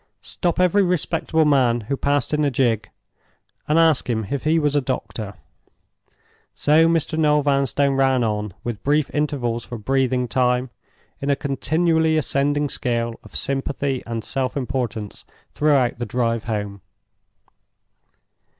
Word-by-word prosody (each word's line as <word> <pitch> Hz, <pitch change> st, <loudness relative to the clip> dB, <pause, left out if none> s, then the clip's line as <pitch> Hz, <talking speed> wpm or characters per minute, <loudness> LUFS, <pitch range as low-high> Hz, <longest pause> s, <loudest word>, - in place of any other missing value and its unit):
Stop 175 Hz, -2 st, -2 dB
every 180 Hz, +2 st, +4 dB
respectable 165 Hz, -3 st, +1 dB
man 125 Hz, -5 st, +3 dB
who 115 Hz, +6 st, -3 dB
passed 145 Hz, +2 st, 0 dB
in 150 Hz, 0 st, +2 dB
a 145 Hz, -, +3 dB
gig, 115 Hz, -5 st, 0 dB, 0.8 s
and 150 Hz, -, +2 dB
ask 160 Hz, -6 st, +3 dB
him 110 Hz, -3 st, -1 dB
if 140 Hz, 0 st, -3 dB
he 160 Hz, +2 st, +3 dB
was 150 Hz, -2 st, +1 dB
a 145 Hz, -, +3 dB
doctor! 115 Hz, -5 st, -4 dB, 1.2 s
So 155 Hz, +2 st, +4 dB
Mr. 165 Hz, -1 st, 0 dB
Noel 150 Hz, -1 st, +3 dB
Vanstone 140 Hz, 0 st, +1 dB
ran 135 Hz, -2 st, +2 dB
on, 105 Hz, -3 st, -2 dB
with 115 Hz, -4 st, -4 dB
brief 150 Hz, +1 st, +1 dB
intervals 130 Hz, -6 st, -1 dB
for 120 Hz, -, -7 dB
breathing 130 Hz, +2 st, 0 dB
time, 125 Hz, 0 st, +1 dB, 0.5 s
in 140 Hz, -, -3 dB
a 140 Hz, -, +3 dB
continually 160 Hz, +3 st, +1 dB
ascending 145 Hz, 0 st, +1 dB
scale 115 Hz, -3 st, -2 dB
of -, -, -15 dB
sympathy 135 Hz, -1 st, -2 dB
and 115 Hz, -1 st, -4 dB
self 135 Hz, +1 st, -2 dB
importance, 125 Hz, -5 st, -4 dB, 0.3 s
throughout 140 Hz, -6 st, +2 dB
the 120 Hz, -, -3 dB
drive 115 Hz, -2 st, -1 dB
home. 105 Hz, -3 st, -4 dB
135 Hz, 140 wpm, -22 LUFS, 120-150 Hz, 1.2 s, every